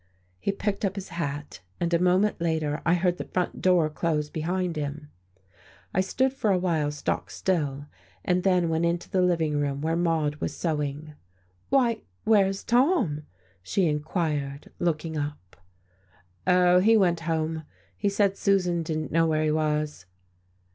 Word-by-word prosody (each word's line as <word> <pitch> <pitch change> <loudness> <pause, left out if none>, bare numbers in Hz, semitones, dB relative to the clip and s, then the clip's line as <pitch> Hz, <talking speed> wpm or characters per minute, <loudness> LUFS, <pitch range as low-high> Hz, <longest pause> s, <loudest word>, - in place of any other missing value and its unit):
He 200 - 0
picked 200 +1 -3
up 195 -1 0
his 195 -1 -6
hat 145 - -4 0.2
and 170 0 -1
a 170 - +4
moment 185 +2 +2
later 160 -2 0
I 170 - +5
heard 180 0 +1
the - - -4
front 180 -1 -2
door 180 -4 +4
close 150 -1 -1
behind 175 +2 -2
him. 150 0 -5 0.8
I 185 - +3
stood 260 +8 0
for 225 -5 -1
a 190 - +4
while 165 -5 0
stock 150 0 -3
still, 145 -6 -1 0.4
and 180 0 +2
then 180 -2 +3
went 160 +1 0
into 170 +1 -1
the 185 - +2
living 165 -5 +1
room, 140 -1 -1
where 160 +3 0
Maude 165 -3 0
was - - -4
sewing. 150 -2 -2 0.6
"Why, 245 -4 +2 0.2
where's 195 -3 +3
Tom?" 240 - +2 0.3
she 180 - 0
inquired, 150 -2 -2
looking 160 -2 -1
up. 145 -11 -6 0.9
"Oh, 180 0 +5
he 220 +4 +5
went 175 -4 +3
home. 160 0 -1 0.3
He 200 - 0
said 200 -1 +2
Susan 180 -4 +1
didn't 155 -1 -3
know 165 +1 +3
where 155 -1 +1
he 155 - +2
was." 150 -8 -1
165 Hz, 155 wpm, -26 LUFS, 150-185 Hz, 0.9 s, I